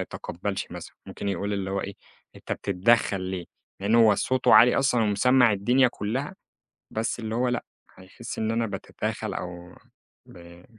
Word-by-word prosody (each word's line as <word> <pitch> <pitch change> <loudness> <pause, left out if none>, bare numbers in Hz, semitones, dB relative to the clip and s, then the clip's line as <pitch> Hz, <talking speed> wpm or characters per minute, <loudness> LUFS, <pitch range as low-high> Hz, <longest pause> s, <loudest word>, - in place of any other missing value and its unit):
يتقبلش 95 +3 -5
مثلًا، - - -9
ممكن 100 - -5
يقول 100 +2 -2
اللي 95 -1 -2
هو 100 0 -1
إيه، 100 +1 -6 0.4
أنت - - -6
بتتدخل 100 +1 +1
ليه؟ 95 -1 -4 0.4
لأن 100 +3 +1
هو 115 -3 +6
صوته 130 +5 +2
عالي 125 +1 +7
أصلًا 130 -4 +2
ومسمّع 120 +3 +4
الدنيا 125 +6 +3
كلها، 125 - -4 0.6
بس 110 +2 -2
اللي 110 -1 -4
هو 125 +1 +1
لأ، 120 0 -1 0.3
هيحس 95 +6 -9
إن 110 0 0
أنا 115 0 0
باتداخل - - -4
أو 90 -1 -7 0.5
ب 85 0 -14
105 Hz, 155 wpm, -26 LUFS, 95-120 Hz, 0.6 s, عالي